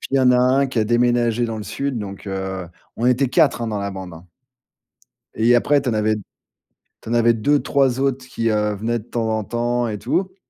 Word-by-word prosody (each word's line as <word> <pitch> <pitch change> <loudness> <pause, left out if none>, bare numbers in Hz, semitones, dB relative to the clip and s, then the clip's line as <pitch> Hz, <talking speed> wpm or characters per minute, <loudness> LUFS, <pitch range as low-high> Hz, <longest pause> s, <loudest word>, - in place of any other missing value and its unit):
puis, - - -7
il - - +3
y - - +4
en 130 -1 +5
a 125 - +4
un 130 +2 +3
qui 130 -3 -3
a 110 - +3
déménagé 120 0 +2
dans 115 -1 -4
le 105 - -6
sud, 140 +2 -3
donc, 100 -1 -7
heu, 95 -1 -4 0.3
on 115 - -3
était 125 +1 +3
4, 155 -3 +3
hein, 115 - -2
dans 105 -2 -2
la 100 0 -3
bande, 95 -2 -8
hein. 80 +2 -13 1.1
Et 115 +2 +3
après 140 +4 +3
tu 130 - -4
en 115 - 0
avais 110 0 +1 0.9
tu - - -10
en 115 - -1
avais 120 0 +4
2-3 135 +1 +1
autres 135 -1 -1
qui, 115 -3 -1
heu, 105 -1 0
venaient 115 +4 -2
de 105 - -11
temps 115 -1 -2
en 110 - -4
temps 120 +2 -1
et 105 -1 -4
tout. 190 - -2
120 Hz, 235 wpm, -21 LUFS, 105-130 Hz, 1.1 s, en